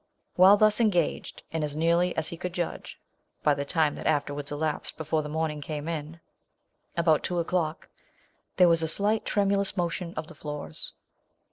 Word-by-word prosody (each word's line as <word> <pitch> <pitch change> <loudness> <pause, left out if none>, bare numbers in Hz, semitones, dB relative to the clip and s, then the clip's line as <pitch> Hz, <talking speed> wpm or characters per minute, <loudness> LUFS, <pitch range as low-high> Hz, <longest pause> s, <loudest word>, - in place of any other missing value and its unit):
While 190 +3 +8
thus 215 +1 +4
engaged, 180 -8 0
and 160 -1 -1
as 150 -1 -3
nearly 170 +3 +2
as 160 0 0
he - - -6
could 175 +1 -5
judge, 175 -1 -4 0.4
(by 150 - +4
the 140 0 -3
time 155 -1 +2
that - - -5
afterwards 145 -1 -1
elapsed 150 +1 -3
before 155 0 0
the 150 - -6
morning 155 -1 -2
came 150 +1 -5
in,) 160 0 -5 0.8
about 165 -2 +3
two 180 - -2
o'clock, 170 -2 -1 0.7
there 180 -1 +7
was 165 -1 +4
a 160 - 0
slight 205 +6 +1
tremulous 200 -1 +1
motion 175 0 -2
of - - -4
the 160 - -12
floors. 150 - -6
160 Hz, 170 wpm, -27 LUFS, 150-180 Hz, 0.8 s, While